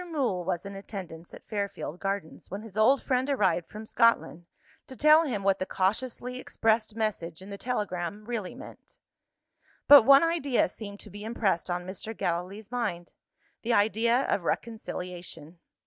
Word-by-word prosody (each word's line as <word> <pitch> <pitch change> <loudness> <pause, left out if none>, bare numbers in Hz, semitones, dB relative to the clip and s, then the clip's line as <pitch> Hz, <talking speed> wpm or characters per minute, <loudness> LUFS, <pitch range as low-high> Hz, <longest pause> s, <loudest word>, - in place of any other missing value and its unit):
Mool 245 - 0
was 175 +1 -2
in 200 0 -7
attendance 185 -4 -8
at - - -13
Fairfield 200 -5 -4
Gardens, 195 -5 -4
when 200 +3 -6
his 220 -4 -12
old 230 +6 +4
friend 260 +1 0
arrived 190 -10 +1
from 215 +1 -8
Scotland, 220 -7 +2 0.4
to 260 - -9
tell 305 +4 +6
him 220 -9 -2
what 195 0 +2
the 185 - -1
cautiously 245 +7 -2
expressed 220 -3 0
message 195 -7 -2
in 190 +2 -11
the 200 - -6
telegram 205 -4 -3
really 225 -5 -4
meant. - - -13 0.9
But 285 -1 +11
one 275 +6 +7
idea 325 -7 +1
seemed 205 -2 -9
to - - -13
be 205 +1 -9
impressed 215 -6 0
on 175 0 -2
Mr. 200 +4 -7
Gallilee's 185 +5 -3
mind 175 -9 -3 0.5
the 235 +1 0
idea 225 +4 +3
of 195 - 0
reconciliation. 180 -6 -5
210 Hz, 160 wpm, -28 LUFS, 185-235 Hz, 0.9 s, But